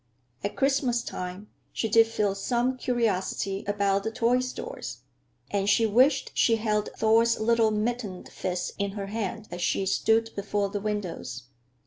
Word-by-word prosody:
At 200 Hz, -, -3 dB
Christmas 270 Hz, -3 st, +1 dB
time 180 Hz, +3 st, -6 dB, 0.2 s
she 225 Hz, -, -1 dB
did 225 Hz, +1 st, +5 dB
feel 210 Hz, -3 st, 0 dB
some 240 Hz, +5 st, 0 dB
curiosity 200 Hz, -5 st, -1 dB
about 200 Hz, -1 st, +1 dB
the 220 Hz, -, -2 dB
toy 235 Hz, +2 st, +2 dB
stores, 255 Hz, -, -5 dB, 0.5 s
and 200 Hz, 0 st, +1 dB
she 225 Hz, +2 st, +4 dB
wished 260 Hz, +6 st, +3 dB
she 230 Hz, -, +4 dB
held 210 Hz, -1 st, 0 dB
Thor's 225 Hz, +1 st, +3 dB
little 225 Hz, 0 st, +3 dB
mittened 215 Hz, -3 st, -2 dB
fist 180 Hz, -1 st, -3 dB
in 200 Hz, -1 st, -1 dB
her 200 Hz, -1 st, -4 dB
hand 220 Hz, 0 st, -3 dB
as 175 Hz, 0 st, -5 dB
she 190 Hz, -, +1 dB
stood 225 Hz, +3 st, +2 dB
before 200 Hz, 0 st, -1 dB
the 205 Hz, 0 st, -4 dB
windows. 185 Hz, -, -4 dB
215 Hz, 150 wpm, -27 LUFS, 200-235 Hz, 0.5 s, did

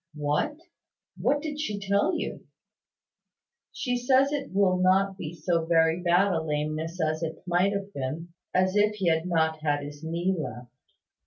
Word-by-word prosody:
"What? 150 Hz, -, 0 dB, 0.6 s
What 290 Hz, +1 st, 0 dB
did 300 Hz, -1 st, -4 dB
she 210 Hz, -10 st, -2 dB
tell 200 Hz, -, +1 dB
you?" -, -, -5 dB, 1.2 s
"She 245 Hz, -2 st, -2 dB
says 260 Hz, +3 st, +3 dB
it 280 Hz, -1 st, -3 dB
will 190 Hz, -2 st, +3 dB
not 190 Hz, +1 st, +3 dB
be 165 Hz, -5 st, -6 dB
so 170 Hz, -2 st, 0 dB
very 165 Hz, 0 st, +3 dB
bad 180 Hz, +3 st, +3 dB
a 165 Hz, -, 0 dB
lameness 155 Hz, +2 st, -3 dB
as 155 Hz, 0 st, 0 dB
it 160 Hz, -1 st, -4 dB
might 180 Hz, +2 st, +2 dB
have 200 Hz, 0 st, -4 dB
been 145 Hz, +6 st, -4 dB, 0.2 s
as 185 Hz, +1 st, +2 dB
if 210 Hz, +1 st, +3 dB
he 190 Hz, -5 st, +1 dB
had 160 Hz, +1 st, +1 dB
not 160 Hz, -2 st, +1 dB
had 145 Hz, -2 st, 0 dB
his 145 Hz, +1 st, -9 dB
knee 170 Hz, +4 st, 0 dB
left. 125 Hz, -7 st, -6 dB
175 Hz, 165 wpm, -27 LUFS, 160-200 Hz, 1.2 s, says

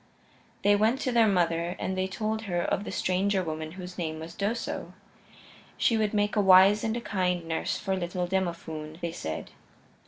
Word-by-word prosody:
They 205 Hz, 0 st, +5 dB
went 220 Hz, +5 st, +2 dB
to 255 Hz, -, 0 dB
their 230 Hz, -2 st, +5 dB
mother 175 Hz, -2 st, +1 dB
and 190 Hz, -, -2 dB
they 185 Hz, 0 st, 0 dB
told 220 Hz, +3 st, -3 dB
her 175 Hz, -1 st, 0 dB
of 195 Hz, +3 st, -1 dB
the -, -, -5 dB
stranger 190 Hz, +1 st, +1 dB
woman 155 Hz, -1 st, -5 dB
whose 180 Hz, 0 st, -8 dB
name 160 Hz, -2 st, -3 dB
was 160 Hz, +1 st, -8 dB
Doso. 220 Hz, +4 st, -3 dB, 0.8 s
She 230 Hz, -, +3 dB
would 215 Hz, -2 st, +1 dB
make 205 Hz, 0 st, +1 dB
a 210 Hz, -, +4 dB
wise 195 Hz, +2 st, +7 dB
and 225 Hz, +1 st, 0 dB
a -, -, -4 dB
kind 180 Hz, -6 st, -1 dB
nurse 165 Hz, 0 st, -1 dB
for 195 Hz, -2 st, -1 dB
little 180 Hz, 0 st, -2 dB
Demophoon, 165 Hz, -4 st, -3 dB
they 170 Hz, -, -2 dB
said. 80 Hz, -, -5 dB
185 Hz, 185 wpm, -28 LUFS, 170-205 Hz, 0.8 s, wise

